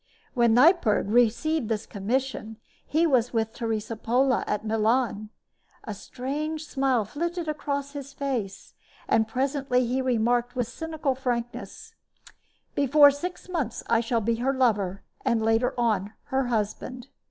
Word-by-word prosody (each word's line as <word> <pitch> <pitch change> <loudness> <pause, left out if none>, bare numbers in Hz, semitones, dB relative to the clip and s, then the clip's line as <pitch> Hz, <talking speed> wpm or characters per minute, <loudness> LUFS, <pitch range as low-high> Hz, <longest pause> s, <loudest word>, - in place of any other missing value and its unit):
When 235 -3 +4
Neipperg 250 - +4
received 240 +4 +2
this 220 -1 -1
commission 225 +1 -3 0.3
he 320 +3 +2
was 250 -6 +2
with 225 -1 0
Teresa 225 -1 -3
Pola 250 +4 +2
at 210 +1 -2
Milan. 220 0 +1 0.5
A 215 - -5
strange 295 +9 -4
smile 265 -6 +1
flitted 335 - -3
across 280 -2 -3
his 280 -1 -7
face; 255 -9 -4 0.3
and 220 -1 +3
presently 260 +1 0
he 255 +3 0
remarked, 245 -1 +1
with 245 -3 0
cynical 315 +1 -2
frankness: 245 -2 -4 0.8
"Before 285 +1 +6
six 350 +7 -6
months 320 -10 -3
I 230 - +5
shall 230 0 0
be 230 +2 0
her 265 +3 0
lover, 205 -7 +1 0.2
and, 235 -3 +2
later 225 +2 +1
on, 215 -4 0 0.2
her 265 -1 +2
husband." 245 +3 -3
245 Hz, 135 wpm, -26 LUFS, 225-275 Hz, 0.8 s, Before